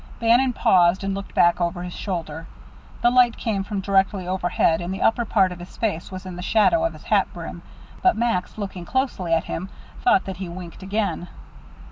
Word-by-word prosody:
Bannon 240 +3 +4
paused 180 -2 +3
and 195 0 -1
looked 195 0 -7
back 175 +1 +4
over 175 +1 -1
his 180 -1 -6
shoulder. 165 -4 -5 0.6
The 240 - +5
light 245 -2 +4
came 205 -4 -1
from 200 -1 -3
directly 195 -1 +1
overhead, 175 -2 +1
and 175 +1 -4
the 190 - -4
upper 235 +1 +2
part 195 -4 +2
of 180 - -8
his 175 - -11
face 200 -7 -2
was 185 0 -7
in 185 -1 -7
the - - -5
shadow 225 - +3
of 330 - 0
his - - -13
hat - - +2
brim, - - -7 0.4
but 370 - +3
Max, 225 -6 -1
looking 195 -4 -5
closely 245 -6 -1
at 165 - +3
him, 185 +4 -5 0.3
thought 190 - +3
that 190 -2 -5
he 190 -2 -5
winked 175 0 -9
again. 195 -2 -2
190 Hz, 200 wpm, -23 LUFS, 175-220 Hz, 0.6 s, The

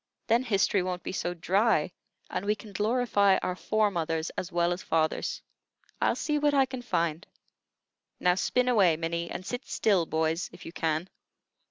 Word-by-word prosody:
Then 230 +1 +3
history 200 -5 +2
won't 180 0 -3
be - - -4
so 175 -1 -2
dry, 185 -1 +2 0.4
and 180 - -3
we 210 +1 +1
can 210 0 -12
glorify 210 -2 +3
our 180 - -1
fore 215 +2 +1
mothers 165 -2 -2
as 185 - -5
well 175 0 +2
as 180 - -6
fathers." 160 -1 -1 0.6
"I'll - - +3
see 300 -1 -1
what 290 0 +2
I 270 -1 +5
can 260 -1 -6
find. 170 -7 -1 1.0
Now 180 - +4
spin 250 +7 +1
away, 195 -10 +4
Minnie, 170 +1 -2
and 185 - -6
sit 245 +4 -5
still, 190 -7 +2
boys, 160 +2 0
if - - -13
you - - -7
can." 160 +1 -1
185 Hz, 175 wpm, -28 LUFS, 170-220 Hz, 1.0 s, I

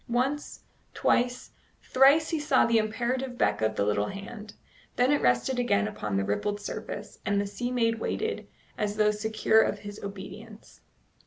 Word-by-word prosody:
Once, 265 +5 -1 0.3
twice, 245 +1 +1 0.3
thrice 280 +4 +5
he 325 - 0
saw 295 -3 +3
the 230 -1 +3
imperative 245 +4 -2
beck 105 - +1
of 110 0 +1
the 100 - +1
little 105 0 +1
hand; 210 +2 -8 0.4
then 250 +3 +3
it 290 - +2
rested 125 - +2
again 105 - +2
upon 105 -1 -3
the 100 - +1
rippled 155 - -1
surface, 205 0 -7
and 200 0 +1
the 200 - 0
sea 225 +5 -4
maid 230 -2 +1
waited, 445 - -3 0.3
as 210 -1 -1
though 210 0 +4
secure 220 +1 +2
of - - 0
his 205 0 -9
obedience. 200 +2 -10
215 Hz, 165 wpm, -28 LUFS, 200-245 Hz, 0.4 s, thrice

